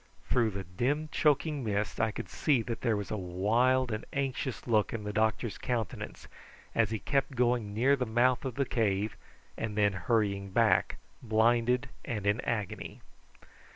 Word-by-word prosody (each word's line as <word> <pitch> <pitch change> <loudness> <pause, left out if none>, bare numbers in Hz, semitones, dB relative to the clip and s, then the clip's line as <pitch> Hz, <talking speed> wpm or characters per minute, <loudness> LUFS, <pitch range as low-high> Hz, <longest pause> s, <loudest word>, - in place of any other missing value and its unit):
Through 120 -3 +3
the 100 -1 -5
dim 130 - -1
choking 150 -1 +2
mist 105 -1 -1
I 110 - +3
could 110 - -6
see 135 -6 +1
that 115 0 -4
there 115 -4 +1
was 105 - -5
a 110 - -1
wild 115 +8 +2
and 110 0 -3
anxious 135 -2 -2
look 110 -3 +2
in 115 -2 -4
the 105 0 -4
doctor's 110 +1 0
countenance 115 -5 -4 0.5
as 115 -3 +2
he 110 - -1
kept 135 +4 -1
going 120 -3 +1
near 130 +5 +4
the 125 -3 -2
mouth 120 +2 +2
of 130 -3 -4
the 140 - +1
cave, 105 -3 0 0.4
and 110 -2 -3
then 105 -1 +3
hurrying 100 +1 0
back 95 - +3 0.2
blinded 120 +2 +2 0.2
and 105 -4 -4
in 105 +4 +2
agony. 105 -5 -4
115 Hz, 165 wpm, -30 LUFS, 105-125 Hz, 0.5 s, near